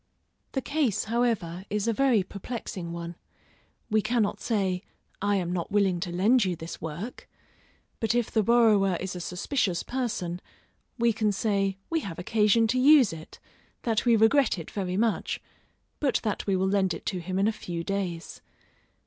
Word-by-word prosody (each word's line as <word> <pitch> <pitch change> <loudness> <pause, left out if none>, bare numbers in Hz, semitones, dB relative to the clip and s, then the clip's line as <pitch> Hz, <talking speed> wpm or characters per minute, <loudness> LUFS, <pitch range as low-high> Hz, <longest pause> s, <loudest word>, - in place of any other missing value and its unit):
The 265 - -1
case, 275 -9 0
however, 215 -7 -1
is 210 +1 -1
a 230 - +2
very 245 -4 +3
perplexing 195 -3 -6
one; 170 0 -5 0.8
we 215 0 +4
cannot 220 -1 0
say, 190 -5 0 0.4
I 205 +1 +2
am 180 -2 -1
not 175 -2 -3
willing 195 -3 +2
to 175 0 -4
lend 210 +8 +4
you 185 -2 0
this 165 0 -8
work; 165 +10 -6 0.7
but 225 +1 +1
if 240 -2 0
the 220 - +3
borrower 210 -5 +4
is 190 0 -4
a - - -4
suspicious 180 - -1
person, 205 -9 -3 0.6
we 235 -1 +3
can 215 -1 +1
say 195 -2 0
we 330 - +2
have 190 - -6
occasion 215 +4 +3
to 255 +2 +2
use 270 - +6
it, 160 -1 -10 0.5
that 225 -2 +1
we 235 -2 +5
regret 225 +2 +4
it 165 - -7
very 185 -2 -2
much, 225 0 0 0.6
but 280 -3 +1
that 210 -2 -2
we 195 - +2
will 190 +1 +1
lend 190 -3 +2
it - - -10
to 185 - -2
him 185 +2 -4
in 195 +2 +3
a - - +3
few 175 -5 -5
days. 180 -3 -4
200 Hz, 175 wpm, -27 LUFS, 180-230 Hz, 0.8 s, use